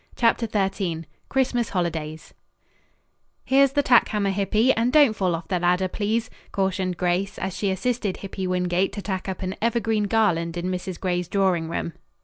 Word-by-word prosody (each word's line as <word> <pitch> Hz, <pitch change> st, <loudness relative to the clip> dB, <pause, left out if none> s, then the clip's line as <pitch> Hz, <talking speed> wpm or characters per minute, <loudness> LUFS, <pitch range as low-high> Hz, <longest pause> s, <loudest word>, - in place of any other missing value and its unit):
CHAPTER 230 Hz, -1 st, +2 dB
XIII 190 Hz, -5 st, -1 dB, 0.3 s
CHRISTMAS 245 Hz, -3 st, +1 dB
HOLIDAYS 160 Hz, -4 st, -3 dB, 1.1 s
"Here's 270 Hz, +1 st, +4 dB
the 285 Hz, -, +2 dB
tack 245 Hz, -2 st, +5 dB
hammer, 200 Hz, -2 st, 0 dB
Hippy, 210 Hz, +6 st, +2 dB
and 230 Hz, +2 st, +1 dB
don't 285 Hz, -5 st, +6 dB
fall 185 Hz, -4 st, +1 dB
off 165 Hz, 0 st, -7 dB
the 180 Hz, 0 st, 0 dB
ladder, 180 Hz, +2 st, +2 dB
please," 215 Hz, +4 st, -1 dB, 0.2 s
cautioned 190 Hz, -2 st, -1 dB
Grace, 180 Hz, +2 st, 0 dB
as 190 Hz, -1 st, -3 dB
she 200 Hz, +1 st, -1 dB
assisted 205 Hz, +1 st, -1 dB
Hippy 195 Hz, -1 st, -5 dB
Wingate 180 Hz, +1 st, 0 dB
to 205 Hz, -, -5 dB
tack 190 Hz, -1 st, -3 dB
up 190 Hz, -, -5 dB
an 185 Hz, 0 st, -2 dB
evergreen 225 Hz, -2 st, +1 dB
garland 180 Hz, -6 st, +1 dB
in 180 Hz, +2 st, -2 dB
Mrs. 180 Hz, -1 st, -4 dB
Gray's 180 Hz, -2 st, -1 dB
drawing 185 Hz, -5 st, +1 dB
room. 165 Hz, 0 st, -3 dB
190 Hz, 165 wpm, -24 LUFS, 180-220 Hz, 1.1 s, don't